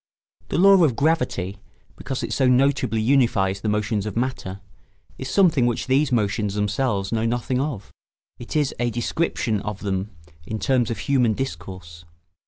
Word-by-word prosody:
The - - -1
law 195 0 +6
of 140 -7 +3
gravity, 125 - 0 0.4
because 130 - -5
it - - -3
so 130 - +2
notably 130 -2 +2
unifies 110 -6 +2
the 110 - -1
motions 105 0 -1
of 105 - -5
matter, 115 -6 -3 0.6
is 130 - -5
something 150 -6 +3
which 120 - -1
these 135 +2 +2
motions 105 -3 0
themselves 105 -1 -1
know 115 0 0
nothing 120 +2 -1
of; 135 -8 -4 0.5
it 120 - -8
is 150 -3 +1
a 120 0 +1
description 120 -2 -1
of 105 -1 -5
them 95 0 -2 0.4
in 110 - -3
terms 125 0 +1
of 115 - -3
human 125 0 +2
discourse. 85 -7 -6
115 Hz, 160 wpm, -23 LUFS, 105-135 Hz, 0.6 s, law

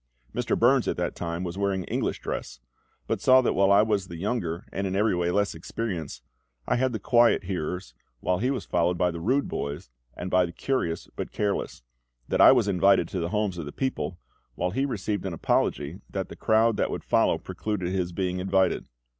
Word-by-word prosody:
Mr. 125 -1 0
Burns 125 +2 +4
at - - -1
that 90 0 -2
time 85 +1 -3
was 90 +2 -5
wearing 100 -2 0
English - - -2
dress; - - -5 0.5
but - - -2
saw 130 0 +7
that 125 - +1
while 100 0 +3
I 100 +1 +6
was 105 -4 0
the 85 - -8
younger 90 -3 -2
and 100 0 -2
in 95 - -2
every 105 -1 +2
way 85 0 0
less 100 +3 +1
experienced, 80 - -5 0.4
I - - +2
had 130 +1 +1
the 110 - -2
quiet 120 +2 +4
hearers, 90 -4 -4 0.3
while 90 +5 0
he 125 +5 +1
was 130 -6 -2
followed 85 0 +1
by 90 0 +2
the 85 - -6
rude 130 +11 +1
boys, 70 -4 -5 0.3
and 90 +1 -5
by 90 -1 +4
the 85 - -9
curious 85 -11 -2
but - - -5
careless; 100 -10 -2 0.5
that - - +2
I - - +10
was 125 -5 +3
invited 95 -2 +4
to 95 - -3
the 85 0 -2
homes 105 -3 -1
of 80 - -4
the - - -6
people, 130 - -3 0.4
while 90 +1 -1
he 135 +7 0
received 105 -5 -2
an 90 - -4
apology 80 +1 0
that 95 -1 -4
the - - -8
crowd 110 0 +3
that - - +1
would - - -4
follow - - +3
precluded 95 -4 -3
his 90 -2 -1
being 90 0 -2
invited. 95 -1 +1
95 Hz, 210 wpm, -26 LUFS, 85-110 Hz, 0.5 s, I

